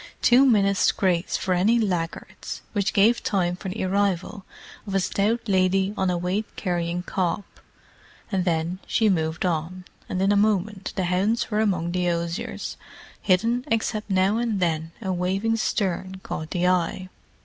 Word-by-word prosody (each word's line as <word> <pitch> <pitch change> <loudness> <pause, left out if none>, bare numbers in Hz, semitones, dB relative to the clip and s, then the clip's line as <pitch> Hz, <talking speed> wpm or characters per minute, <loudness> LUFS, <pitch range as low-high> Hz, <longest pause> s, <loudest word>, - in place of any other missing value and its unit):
Two 255 +3 +6
minutes' 200 -5 +3
grace 180 -2 0
for 185 - -1
any 200 +7 +3
laggards—which 195 +1 -3
gave 220 +4 +4
time 180 -3 0
for 190 - -6
the 190 +2 -3
arrival 195 0 0 0.4
of 195 - -3
a - - +4
stout 205 +5 0
lady 190 0 +2
on 190 -2 0
a 180 - 0
weight 185 +5 -1
carrying 175 -2 -2
cob—and 190 +1 -5
then 170 +1 -1
she 220 -2 +2
moved 160 -2 0
on, 180 +2 -2 0.2
and 185 - -2
in 195 +1 +3
a - - +4
moment 205 -1 +1
the 190 - 0
hounds 195 +7 0
were 210 - +1
among 180 -6 0
the 180 0 0
osiers, 170 +7 -3 0.4
hidden 230 +6 +2
except 220 -3 -1
that 195 - -1
now 190 +3 +3
and 230 -4 -1
then 165 -2 -1
a 190 -1 -1
waving 190 +5 0
stern 190 -3 -1
caught 155 0 -5
the 180 0 -1
eye. 185 +1 0
190 Hz, 160 wpm, -24 LUFS, 180-205 Hz, 0.4 s, Two